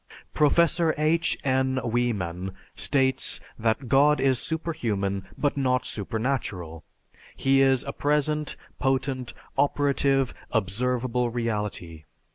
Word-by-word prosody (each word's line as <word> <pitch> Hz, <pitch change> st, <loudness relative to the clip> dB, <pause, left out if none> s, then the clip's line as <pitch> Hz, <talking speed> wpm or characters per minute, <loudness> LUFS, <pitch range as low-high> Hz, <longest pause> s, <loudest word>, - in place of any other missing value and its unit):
Professor 170 Hz, +2 st, +3 dB
H. 160 Hz, +2 st, +2 dB
N. 130 Hz, -1 st, +1 dB
Wieman 100 Hz, -7 st, -1 dB, 0.2 s
states 130 Hz, -2 st, +1 dB, 0.2 s
that, 115 Hz, +3 st, 0 dB
"God 145 Hz, +4 st, +4 dB
is 130 Hz, -2 st, +2 dB
superhuman, 110 Hz, -, -2 dB
but 145 Hz, -, 0 dB
not 130 Hz, -2 st, +1 dB
supernatural. 105 Hz, -7 st, -3 dB, 0.5 s
He 135 Hz, 0 st, +3 dB
is 135 Hz, -1 st, +4 dB
a 140 Hz, -, -5 dB
present, 150 Hz, +1 st, 0 dB, 0.2 s
potent, 130 Hz, -2 st, -1 dB, 0.2 s
operative, 140 Hz, -2 st, +2 dB, 0.2 s
observable 120 Hz, +3 st, 0 dB
reality.... 105 Hz, -9 st, -3 dB
130 Hz, 95 wpm, -26 LUFS, 110-140 Hz, 0.5 s, God